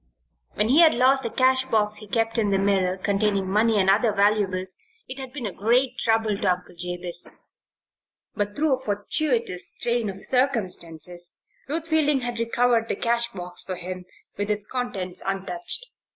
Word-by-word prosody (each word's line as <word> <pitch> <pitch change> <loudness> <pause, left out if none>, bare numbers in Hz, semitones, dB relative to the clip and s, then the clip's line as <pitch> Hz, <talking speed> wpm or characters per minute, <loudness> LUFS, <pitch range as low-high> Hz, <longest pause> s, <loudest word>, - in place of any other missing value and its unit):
When 215 - +1
he 280 +6 +5
had 330 -2 +7
lost 260 +1 +3
a - - -4
cash 260 +2 +2
box 215 -4 +1
he 210 - -8
kept 225 +2 0
in 210 -2 +1
the 195 - +2
mill, 190 -2 +1
containing 200 0 0
money 215 +3 +2
and 190 -2 +2
other 215 +4 +4
valuables, 200 -3 +1 0.3
it 260 +2 -6
had 265 -2 -7
been 265 -3 -6
a 200 - -4
great 250 +4 +1
trouble 225 -2 +1
to 190 - +2
Uncle 180 0 -10
Jabez. 175 0 -2 1.1
But 205 -1 -2
through 290 -3 +2
a - - -17
fortuitous 220 - -1
train 235 -3 0
of 190 - -6
circumstances 180 - 0 0.3
Ruth 320 +3 -2
Fielding 300 -4 +2
had 240 -1 -2
recovered 230 0 +2
the - - -1
cash 235 0 +1
box 180 -1 -4
for 185 - -5
him, 180 +1 -6 0.3
with 205 +1 -2
its 210 -1 -1
contents 195 -8 -3
untouched. 195 - -3
210 Hz, 170 wpm, -24 LUFS, 190-245 Hz, 1.1 s, had